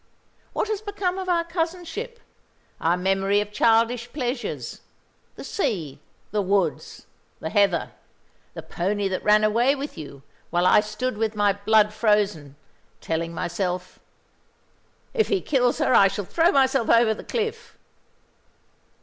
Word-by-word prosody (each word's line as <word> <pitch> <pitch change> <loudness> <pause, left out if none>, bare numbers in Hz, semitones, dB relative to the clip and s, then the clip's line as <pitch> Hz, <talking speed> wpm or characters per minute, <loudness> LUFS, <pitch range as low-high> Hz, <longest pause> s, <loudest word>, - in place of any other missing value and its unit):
What - - -1
has 430 -1 -2
become 395 -3 -2
of 370 -1 -4
our 340 -1 +2
cousinship; 350 +7 -4 0.6
our 170 +2 +1
memory 195 +2 +1
of 210 0 -3
childish 230 +3 +2
pleasures, 250 -3 -4 0.5
the - - -9
sea, 180 - -3 0.3
the 210 - 0
woods, 190 -5 -1 0.3
the 160 - -5
heather; 195 -5 +2 0.6
the - - -7
pony 200 +3 -2
that 185 - -3
ran 210 0 +4
away 235 +6 +3
with 280 - -6
you, 140 -2 -10 0.3
while 175 +1 +1
I 185 - +6
stood 215 +3 -3
with 220 -1 -1
my 205 -1 +3
blood 210 +1 +3
frozen, 210 - 0 0.4
telling 165 +1 -3
myself, 180 +1 -3 1.1
'If 445 -3 +2
he 400 - +1
kills 250 -7 +1
her - - +1
I 195 - +7
shall 200 0 -4
throw 335 - +2
myself 265 -3 +2
over 230 -1 +5
the - - -9
cliff'? 455 0 -4
215 Hz, 140 wpm, -24 LUFS, 195-285 Hz, 1.1 s, I